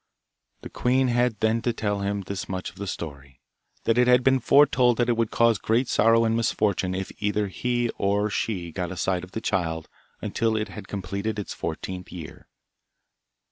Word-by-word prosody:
The - - -7
queen 130 +1 +2
had 120 -3 +1
then 110 +1 +2
to 120 - +1
tell 105 -3 -1
him 100 0 -1
this 100 0 -5
much 95 -1 -4
of 90 - -23
the 100 0 -5
story, 70 -7 -7 0.4
that 115 +1 +2
it 125 - +4
had 125 0 +5
been 130 0 +4
foretold 125 -2 +4
that 120 0 +1
it 120 - +3
would 115 -1 0
cause 115 -3 +3
great 115 +3 +1
sorrow 115 +1 +4
and 110 0 +1
misfortune 100 -5 0
if 95 0 -4
either 105 0 0
he 120 +3 -1
or 100 +1 +2
she 90 -6 -2
got 90 +1 -3
a 95 - -6
sight 90 0 0
of 90 - -11
the 110 - -3
child 80 -6 -1 0.3
until 115 -1 0
it 110 - -2
had 105 - -9
completed 100 +2 -3
its 105 - -4
fourteenth 90 -1 -5
year. 85 -4 -9
105 Hz, 190 wpm, -25 LUFS, 95-115 Hz, 0.4 s, had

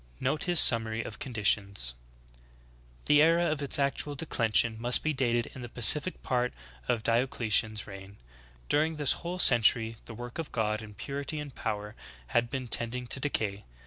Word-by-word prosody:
10. - - -14
Note 145 +4 -1
his 175 -2 +3
summary 115 -1 +4
of - - -9
conditions: 100 - 0 1.1
"The 150 0 +3
era 165 +2 +2
of 155 -3 -3
its 140 - +3
ac 140 -1 -1
tual 145 -1 -3
declension 115 -6 0
must 120 +1 +7
be 155 - -1
dated 120 -3 -1
in 130 - -11
the 120 - -9
pacific 150 +9 +5
part 125 -1 -2 0.3
of 115 -2 -2
Diocletian's 115 -3 0
reign. 100 0 -13 0.5
During 155 +2 0
this 145 -3 +1
whole 175 +2 -5
century 115 -6 +3
the 115 - -10
work 120 +5 -9
of 160 - -6
God, 110 -1 -3
in 105 -1 -13
purity 140 +6 -6
and 145 -2 -9
power, 105 -3 -6 0.4
had 120 0 -1
been 130 -2 -6
tending 120 +2 -1
to 130 - -2
decay. 105 -8 -3
120 Hz, 175 wpm, -27 LUFS, 110-145 Hz, 1.1 s, must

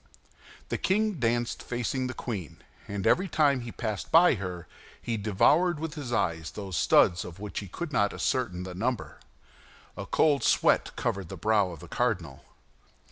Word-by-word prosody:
The - - -2
king 210 -2 +1
danced 120 0 0
facing 125 +2 -2
the 130 - -6
queen, 100 - -6 0.2
and 100 -2 -4
every 190 +2 +3
time 145 -6 +2
he 120 -1 -7
passed 110 -5 -4
by 170 +2 +7
her, 90 -6 -5 0.3
he 115 - -3
devoured 145 - +3
with 160 -1 -4
his 145 -6 -6
eyes 80 -7 0
those 95 -3 -6
studs 85 +1 +4
of 90 -1 -9
which 105 -1 -5
he 100 - -7
could 150 - -6
not 100 -3 +2
ascertain 95 -9 -1
the 90 -1 -7
number. 120 +6 -3 0.8
A - - -6
cold 145 -3 +3
sweat - - +3
covered 95 -1 -2
the 95 - -7
brow 105 +1 +2
of 85 -4 -9
the 90 - -10
cardinal. - - -2
115 Hz, 170 wpm, -28 LUFS, 95-140 Hz, 0.8 s, by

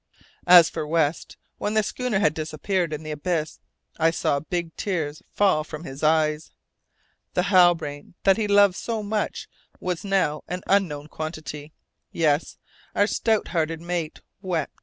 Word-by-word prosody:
As 175 -2 +9
for 155 -2 -4
West, 160 -1 0 0.2
when 210 +1 -2
the 215 - +4
schooner 250 -1 -2
had 155 -6 +3
disappeared 160 +3 -2
in 150 0 -5
the 155 - -5
abyss, 155 +1 -2 0.4
I 160 0 +4
saw 145 -3 0
big 165 +2 -4
tears 155 -7 -3
fall 190 -7 +2
from 150 0 -8
his 135 -3 -8
eyes. 155 0 +2 0.9
The 180 - +2
Halbrane 170 -4 +3
that 195 +1 +5
he 215 -2 0
loved 200 -1 +5
so 225 0 -3
much 210 +1 -2 0.3
was 180 -2 -3
now 185 -7 0
an 180 +1 -5
unknown 170 -8 +1
quantity! 155 -1 -7 0.4
Yes, 155 -2 0 0.4
our 205 - +4
stout 220 0 0
hearted 165 -1 -1
mate 170 -2 -4 0.2
wept. 175 -6 -3
165 Hz, 150 wpm, -24 LUFS, 155-190 Hz, 0.9 s, As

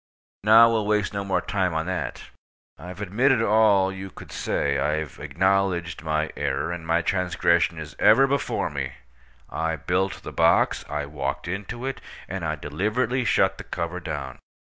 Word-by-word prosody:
Now, 115 +2 +7
we'll 110 -2 0
waste 105 -1 +1
no 100 0 -2
more 95 -2 0
time 95 -4 -1
on 80 0 -1
that. 90 -9 -4 0.5
I've 90 +5 -9
admitted 120 +7 +2
all 105 -3 +4
you 95 0 -7
could - - -12
say. - - -1
I've 75 0 -2
acknowledged 95 -2 0
my 80 -1 -1
error, 70 +2 -1
and 85 -2 -6
my 85 +1 +2
transgression 85 -2 +1
is 75 -2 -8
ever 110 +6 +6
before 140 +1 -1
me. 70 -2 -4 0.6
I 80 0 -1
built 90 +5 -1
the - - -7
box, - - +3
I 75 -1 -2
walked 70 +1 -4
into 105 +7 -5
it, 135 - -4 0.3
and 95 0 -5
I 80 -1 -1
deliberately 110 - -1
shut - - +2
the - - -6
cover 85 +2 -4
down. 75 -6 -6
90 Hz, 165 wpm, -25 LUFS, 80-105 Hz, 0.6 s, Now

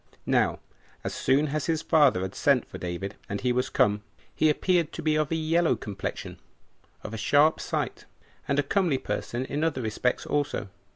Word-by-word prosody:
Now, - - +2 0.5
as - - -3
soon 145 +3 +2
as 150 0 -2
his 160 -1 0
father 145 - +4
had 95 +1 -4
sent 140 -4 +2
for - - -9
David, 90 +3 -5
and 100 - -2
he 125 - +1
was 125 +1 0
come, 105 0 +2 0.3
he 155 - +3
appeared 170 +1 +2
to - - -6
be 155 -1 +2
of 155 -1 +1
a - - +2
yellow 160 +1 +2
complexion, 100 -2 -6 0.6
of 105 - -7
a - - -3
sharp 145 +8 +4
sight, - - -3 0.4
and 140 - +1
a 145 - +3
comely 170 -1 +1
person 125 -1 -3
in 145 +3 -2
other 145 -6 0
respects 110 +3 -1
also. 145 -8 -1
140 Hz, 185 wpm, -27 LUFS, 110-155 Hz, 0.6 s, father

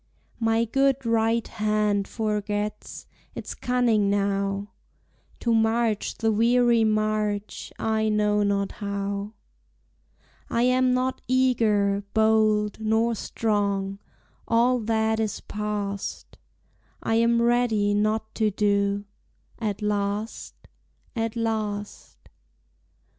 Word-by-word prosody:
My 225 0 +2
good 270 +2 +1
right 230 0 +1
hand 210 -1 0
forgets 210 -1 -3 0.3
Its - - -6
cunning 235 -5 +1
now; 200 0 -1 0.7
To 235 - +1
march 225 -1 +1
the 225 -1 +1
weary 235 +1 +3
march 215 -1 -1
I 220 0 0
know 210 -1 +2
not 200 -1 0
how. 200 0 -4 1.2
I 235 - +1
am 255 0 +3
not 255 +1 -1
eager, 220 -6 +2
bold, 215 -1 +3
Nor 220 +2 +1
strong, 200 -3 -1 0.5
all 240 +2 +3
that 220 0 0
is 215 -2 -2
past; 205 -1 -4 0.7
I - - 0
am 235 0 +3
ready 235 -4 +2
not 215 +1 0
to 220 -2 +1
do, 200 0 0 0.5
At 210 -2 -3
last, 205 +1 -2 0.6
at 225 -1 -2
last. 215 -3 -3
215 Hz, 100 wpm, -25 LUFS, 205-230 Hz, 1.2 s, weary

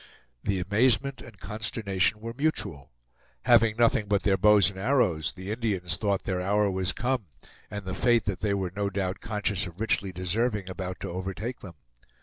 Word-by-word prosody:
The 100 -2 0
amazement 120 +8 +2
and 115 -4 -13
consternation 105 0 -1
were 115 +1 -5
mutual. 130 - -2 0.6
Having 115 -3 +5
nothing 115 -3 +3
but 100 -1 +1
their 100 -2 +3
bows 105 0 +5
and 95 - -10
arrows, 95 - +1
the 95 +2 -6
Indians 100 -7 -1
thought 100 -1 0
their 90 -1 -2
hour 100 +2 +2
was 95 0 +1
come, 125 -1 -2 0.4
and 105 -2 -6
the 95 - -4
fate 120 0 +3
that 100 -3 -2
they 100 -2 0
were 95 -2 -3
no 100 0 0
doubt 95 -1 -2
conscious 105 -2 -1
of 90 +1 -12
richly 100 -3 +1
deserving 95 +2 -1
about 90 0 -5
to 95 - -4
overtake 95 +7 -4
them. 90 -5 -11
100 Hz, 175 wpm, -27 LUFS, 95-110 Hz, 0.6 s, Having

